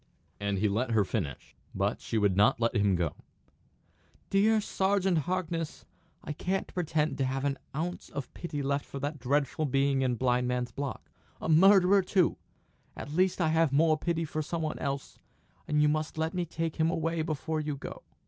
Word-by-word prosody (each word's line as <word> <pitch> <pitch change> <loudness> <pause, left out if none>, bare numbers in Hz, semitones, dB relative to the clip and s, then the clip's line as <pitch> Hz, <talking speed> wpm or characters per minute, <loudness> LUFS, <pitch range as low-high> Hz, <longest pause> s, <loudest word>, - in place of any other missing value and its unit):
And 100 -1 -1
he 105 +3 +2
let 115 +4 0
her 105 -3 +3
finish. 85 - -4 0.2
But - - 0
she 115 - -2
would 100 -3 +3
not 105 +4 +4
let 115 +1 +1
him 100 -3 +3
go. 85 -3 -1 1.2
"Dear 215 +3 +4
Sergeant 190 -3 +1
Harkness, 165 -3 -3 0.4
I 150 - -4
can't 190 +5 -2
pretend 155 -5 0
to - - +2
have 135 +1 -2
an 140 -1 -1 0.2
ounce 170 +4 -3
of 140 -3 -6
pity 150 -5 -4
left 140 +1 0
for - - -8
that 145 +2 -3
dreadful 140 +4 0
being 135 0 +2
in 125 -2 +1
Blind 125 0 +1
Man's 125 -1 -1
Block. 140 +3 -5 0.3
A - - -4
murderer, 195 +3 +6
too! 185 -1 +2 0.6
At 145 - -7
least 185 +3 +2
I 165 -3 +2
have 160 -2 +3
more 155 +3 +4
pity 165 +1 -1
for 155 0 -3
some 165 +2 -3
one 155 - -3
else, 140 -2 -4 0.5
and 150 0 +2
you - - +5
must 155 +1 -1
let 160 +2 -1
me 180 -2 -2
take 165 0 -3
him 160 0 +3
away 165 -1 -1
before 155 0 -2
you 150 -1 -2
go." - - -8
150 Hz, 185 wpm, -29 LUFS, 130-165 Hz, 1.2 s, murderer